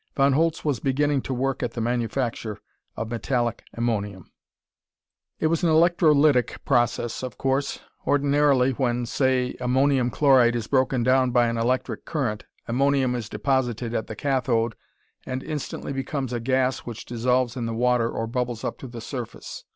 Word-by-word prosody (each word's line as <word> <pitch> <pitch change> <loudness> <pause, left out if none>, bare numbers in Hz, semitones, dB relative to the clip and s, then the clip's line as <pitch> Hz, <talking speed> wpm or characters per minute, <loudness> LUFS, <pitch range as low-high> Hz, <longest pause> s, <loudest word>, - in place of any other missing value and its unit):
Von 140 0 +4
Holtz 165 +3 +1
was 140 -6 0
beginning 140 +1 +1
to - - -6
work 130 +1 -1
at 120 -2 -2
the - - -5
manufacture 120 -1 -2 0.4
of 110 0 -4
metallic 120 0 -1
ammonium. 105 -5 -2 1.1
It - - -1
was 165 +2 +1
an 170 - +4
electrolytic 155 -5 +3
process, 120 -2 +1
of 130 -3 -6
course. 135 +1 -1 0.3
Ordinarily, 140 -2 +3
when 120 -2 -1
say 130 0 0
ammonium 130 0 +2
chloride 130 -4 +4
is 115 -2 -2
broken 130 -1 +1
down 130 +1 +3
by 120 -1 +3
an 115 - -2
electric 125 +3 -1
current, 120 -10 -2 0.2
ammonium 135 +1 +2
is 120 -3 -4
deposited 120 0 -1
at 110 - -2
the 110 - -6
cathode 120 -3 0 0.5
and 130 +1 -3
instantly 150 -2 -5
becomes 135 -1 -3
a 120 - -1
gas 130 +2 +1
which 120 -1 -8
dissolves 125 +1 0
in 120 -3 -3
the 115 - -3
water 120 -1 +2
or 115 - -3
bubbles 120 0 -3
up - - -4
to 135 - -8
the 120 -1 -8
surface. 120 -1 -7
125 Hz, 160 wpm, -24 LUFS, 120-135 Hz, 1.1 s, Von